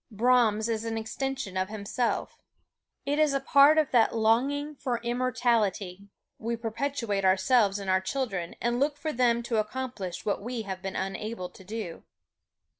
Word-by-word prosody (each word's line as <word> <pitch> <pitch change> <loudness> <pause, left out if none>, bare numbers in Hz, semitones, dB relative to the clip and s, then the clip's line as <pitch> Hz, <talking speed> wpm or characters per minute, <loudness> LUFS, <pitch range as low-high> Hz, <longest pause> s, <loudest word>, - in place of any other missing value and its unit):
Brahms 225 -1 +3
is 225 -1 -1
an 225 -1 -3
extension 240 -1 -4
of 185 +1 0
himself. 215 +3 -2 0.7
It 290 +2 0
is 300 -2 +3
a - - +2
part 280 +3 +6
of 310 -3 +2
that 230 -2 +4
longing 270 +7 +1
for 255 -4 -2
immortality 235 -6 0 0.3
we 230 +1 -2
perpetuate 230 -2 -2
ourselves 195 +2 +3
in 200 -1 -6
our 190 0 +3
children 190 -5 -3
and 240 +1 0
look 290 +1 +1
for 310 +1 -3
them 235 -1 +2
to 235 -2 -1
accomplish 215 -4 -3
what 205 - 0
we 235 +1 -4
have 190 -2 -6
been 195 0 -5
unable 195 0 -4
to 190 - -15
do. 205 -3 -6
230 Hz, 160 wpm, -28 LUFS, 200-255 Hz, 0.7 s, part